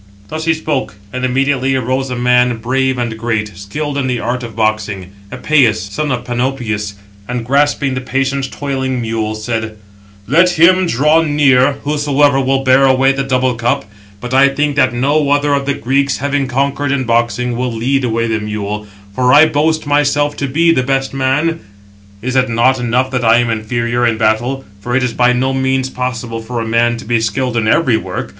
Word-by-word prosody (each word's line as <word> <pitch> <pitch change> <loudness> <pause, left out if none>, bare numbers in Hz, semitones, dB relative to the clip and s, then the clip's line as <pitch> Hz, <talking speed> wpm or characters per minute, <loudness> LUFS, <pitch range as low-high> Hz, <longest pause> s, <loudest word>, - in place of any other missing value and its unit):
Thus 155 +4 -4
he 165 0 +2
spoke; 150 -8 -3 0.2
and 125 0 -4
immediately 135 +1 +1
arose 130 +1 -1
a 125 - -3
man 125 0 +2
brave 130 +3 -1
and 120 -2 -3
great, 110 -3 -2
skilled 140 +9 -4
in 135 - -1
the 125 -2 -1
art 120 +3 -2
of 115 -3 -8
boxing, 105 -4 -2 0.2
Epëus, 125 -3 +2 0.2
son 150 +7 -2
of 125 -1 -2
Panopeus; 120 -5 -2 0.3
and 125 -1 -4
grasping 140 +1 +1
the 130 - -3
patient 135 +1 -2
toiling 130 -2 -3
mule, 110 -2 -2
said: 110 -1 -4 0.5
"Let 170 - +3
him 185 +3 +5
draw 150 +4 +3
near, 145 -4 +3
whosoever 145 -1 +2
will 135 0 0
bear 130 +1 +4
away 135 0 +3
the 135 0 -2
double 130 -1 0
cup; 120 -1 -1 0.3
but 125 +3 -6
I 135 +1 +5
think 145 +1 -1
that 150 - +3
no 140 +4 +1
other 145 0 +2
of 140 -1 -1
the 140 - 0
Greeks 135 +4 0
having 140 0 -1
conquered 140 +2 -1
in 140 -2 0
boxing, 120 +1 0
will 125 +1 -2
lead 130 +4 -1
away 115 -1 0
the 110 -1 -1
mule; 105 0 -4 0.3
for 125 +3 +2
I 150 +4 +7
boast 155 +1 0
myself 145 0 +1
to 140 - -2
be 165 +5 +2
the 145 - +2
best 135 +1 -1
man. 135 +5 0 0.6
Is 130 +1 -2
it 130 -1 +2
not 120 +3 +2
enough 125 +2 0
that 125 -2 -1
I 115 0 +5
am 120 -1 +1
inferior 120 +2 -1
in 115 -1 0
battle? 120 +5 0 0.2
766 - - -25
For 120 0 -2
it 130 - +2
is 125 -2 -1
by 125 +2 +3
no 130 +2 0
means 130 0 0
possible 120 -2 -4
for 120 +2 -5
a 115 - -3
man 120 +1 +1
to - - -10
be 115 0 0
skilled 120 +3 -1
in 115 -2 0
every 125 -1 +3
work. - - -5
130 Hz, 195 wpm, -15 LUFS, 120-140 Hz, 0.6 s, I